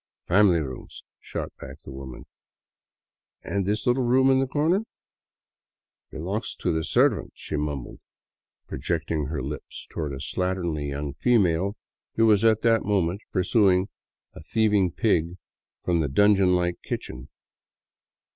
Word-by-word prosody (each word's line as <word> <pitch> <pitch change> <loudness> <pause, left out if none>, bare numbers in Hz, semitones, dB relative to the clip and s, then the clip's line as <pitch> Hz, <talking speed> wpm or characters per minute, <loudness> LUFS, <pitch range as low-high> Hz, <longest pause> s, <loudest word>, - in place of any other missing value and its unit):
" - - -50
Family 90 -3 +5
rooms," 65 -4 -8 0.2
shot - - -6
back 65 +2 -9
the - - -10
woman. 65 -1 -9 0.6
" - - -54
And 100 -2 -2
this 105 +2 -1
little 125 +2 +2
room 130 +2 +4
in 130 - +4
the 135 - +1
corner? 155 +8 +1 0.5
" - - -69
" - - -68
Belongs 95 +8 -4
to - - -1
the 80 0 -1
servant," - - +2
she - - -6
mumbled, 75 -3 -4 0.7
projecting 75 -3 -2
her 75 0 -3
lips - - -7
toward 75 -3 -3
a 65 - -6
slatternly 85 -3 -2
young 70 0 -4
female 100 - +2 0.4
who 115 - +4
was 105 -1 +4
at 110 -1 +3
that 115 -2 +3
moment 95 -1 0
pursuing 95 0 +3 0.4
a - - -11
thieving 105 +1 +2
pig 85 -3 0 0.5
from 85 -2 +1
the 75 -4 0
dungeon 95 +3 +4
like 90 -1 -1
kitchen. 65 +2 -6
90 Hz, 145 wpm, -25 LUFS, 75-105 Hz, 0.7 s, Family